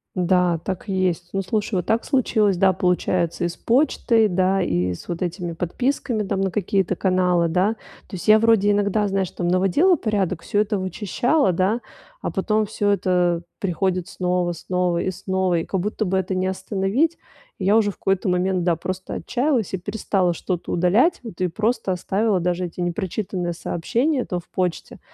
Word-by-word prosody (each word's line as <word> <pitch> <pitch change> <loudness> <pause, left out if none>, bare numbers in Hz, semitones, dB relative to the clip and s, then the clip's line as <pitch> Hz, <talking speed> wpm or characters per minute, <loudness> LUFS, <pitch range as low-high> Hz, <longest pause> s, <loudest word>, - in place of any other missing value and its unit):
Да, 180 -1 +2
так 190 +1 -4
есть. 185 -2 -1
Ну, 195 - 0
слушай, 210 +2 -1
вот 180 -2 -1
так 225 +4 +1
случилось. 215 -7 +2
Да, 190 +1 +4
получается 180 -1 0
и - - +2
с 170 - -6
почтой, 230 -3 +2
да 190 0 +1
и 90 - 0
с - - -13
вот 170 -1 -4
этими 175 -1 -3
подписками 225 - -1
там 195 -1 -2
на 195 - +1
какие-то 195 -1 0
каналы, 180 -2 +2
да. 185 +6 +2 0.3
То 200 - -8
есть 180 - -7
я 215 0 +7
вроде 220 -2 +4
иногда, 205 +1 +1
знаешь, 195 -2 -1
там 175 - -3
наводила 195 - +3
порядок, 195 -6 -1
всё 205 - -1
это 210 -1 -1
вычищала, 210 - +1
да, 190 +7 +1 0.4
а - - -3
потом 215 +2 +1
всё 205 -1 -1
это 180 -3 +1 0.2
приходит 185 -1 -1
снова 180 -1 -1
снова 180 +1 -1
и 185 - -1
снова, 190 -1 0
и 165 - -4
как 190 - -2
будто 210 +3 -2
бы 190 +1 0
это 190 0 -1
не 185 0 0
остановить. 195 - 0 0.4
Я 200 +3 +3
уже 210 -2 +2
в - - -18
какой-то 195 0 0
момент, 180 0 +1
да, 170 -1 +2
просто 185 +3 -5
отчаялась 250 - -1
и - - 0
перестала 185 -1 0
что-то 175 +1 -4
удалять. 210 - +3
Вот 225 -8 -9
и 180 - +2
просто 215 +2 -1
оставила 195 +3 0
даже 180 +1 -1
эти 175 - -9
непрочитанные 180 0 -2
сообщения 245 - -1
то 180 - -3
в 175 - -17
почте. 180 -2 -3
190 Hz, 180 wpm, -22 LUFS, 180-210 Hz, 0.4 s, я